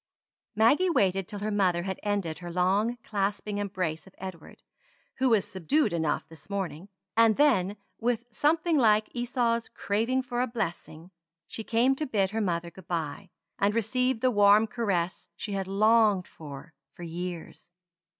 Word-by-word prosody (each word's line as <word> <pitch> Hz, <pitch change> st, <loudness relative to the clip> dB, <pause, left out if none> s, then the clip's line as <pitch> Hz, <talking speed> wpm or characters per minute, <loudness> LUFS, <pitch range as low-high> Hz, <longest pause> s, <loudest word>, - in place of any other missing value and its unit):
Maggie 280 Hz, -, +4 dB
waited 195 Hz, -, +2 dB
till 210 Hz, -, -7 dB
her 210 Hz, +1 st, -3 dB
mother 185 Hz, -4 st, +2 dB
had 190 Hz, 0 st, -4 dB
ended 200 Hz, -6 st, -2 dB
her 175 Hz, -1 st, -7 dB
long 195 Hz, +7 st, +1 dB
clasping 205 Hz, 0 st, -2 dB
embrace 185 Hz, -6 st, -3 dB
of 190 Hz, -, -17 dB
Edward, 185 Hz, -3 st, -9 dB, 0.6 s
who 260 Hz, 0 st, +3 dB
was 220 Hz, -5 st, +3 dB
subdued 190 Hz, -, 0 dB
enough 160 Hz, -3 st, -1 dB
this 160 Hz, +3 st, -16 dB
morning; 195 Hz, -2 st, -4 dB, 0.3 s
and 225 Hz, -1 st, +5 dB
then, 210 Hz, -9 st, +3 dB, 0.2 s
with 235 Hz, 0 st, 0 dB
something 310 Hz, +6 st, +2 dB
like 215 Hz, -3 st, +3 dB
Esau's 240 Hz, -1 st, 0 dB
craving 230 Hz, +5 st, -1 dB
for 245 Hz, -2 st, -2 dB
a 255 Hz, -, +1 dB
blessing, 175 Hz, -6 st, -5 dB, 0.3 s
she 225 Hz, -, -6 dB
came 235 Hz, +5 st, +3 dB
to 305 Hz, -, -2 dB
bid 195 Hz, -6 st, +1 dB
her 220 Hz, +1 st, -1 dB
mother 170 Hz, -3 st, -1 dB
good 190 Hz, -1 st, -15 dB
bye, 160 Hz, -5 st, -3 dB, 0.3 s
and 205 Hz, +2 st, +2 dB
received 250 Hz, +2 st, 0 dB
the 255 Hz, -, +3 dB
warm 205 Hz, 0 st, +6 dB
caress 195 Hz, -6 st, -2 dB
she 210 Hz, -, -6 dB
had 195 Hz, -1 st, -2 dB
longed 210 Hz, -1 st, +3 dB
for 145 Hz, 0 st, -11 dB, 0.2 s
for 175 Hz, -, -9 dB
years. 175 Hz, +1 st, -6 dB
205 Hz, 160 wpm, -28 LUFS, 180-230 Hz, 0.6 s, warm